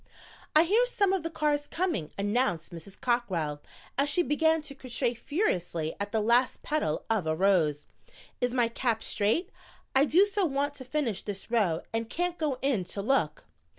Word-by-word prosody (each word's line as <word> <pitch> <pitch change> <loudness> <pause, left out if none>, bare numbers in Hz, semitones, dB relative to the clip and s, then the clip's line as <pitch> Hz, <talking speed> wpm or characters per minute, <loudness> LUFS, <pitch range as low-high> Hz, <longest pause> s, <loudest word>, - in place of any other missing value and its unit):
"I 310 - +8
hear 420 +8 +3
some 400 -5 +2
of 385 - +1
the 330 - -3
cars 295 -2 0
coming," 330 - -1
announced 205 -4 0
Mrs. 170 +4 -9
Cockrell, 180 -12 -1 0.4
as 285 +1 +3
she 350 +5 +3
began 320 0 +2
to 300 - -7
crochet 255 -3 -2
furiously 180 - -1
at 200 0 -3
the 220 - +1
last 235 +4 +2
petal 300 - -1
of 215 -7 0
a 155 - +1
rose. 160 -5 +2 0.6
"Is 245 0 +1
my 245 -2 +2
cap 230 -1 -1
straight? 225 - 0 0.4
I 270 +2 +6
do 360 +6 +5
so 410 -1 -1
want 285 -2 0
to 260 - -8
finish 255 -6 -1
this 205 +2 -7
row 195 -9 +1
and 225 0 -2
can't 350 +3 -2
go 295 -5 0
in 265 -9 +2
to 200 - -5
look." 180 - 0
245 Hz, 180 wpm, -29 LUFS, 200-305 Hz, 0.6 s, I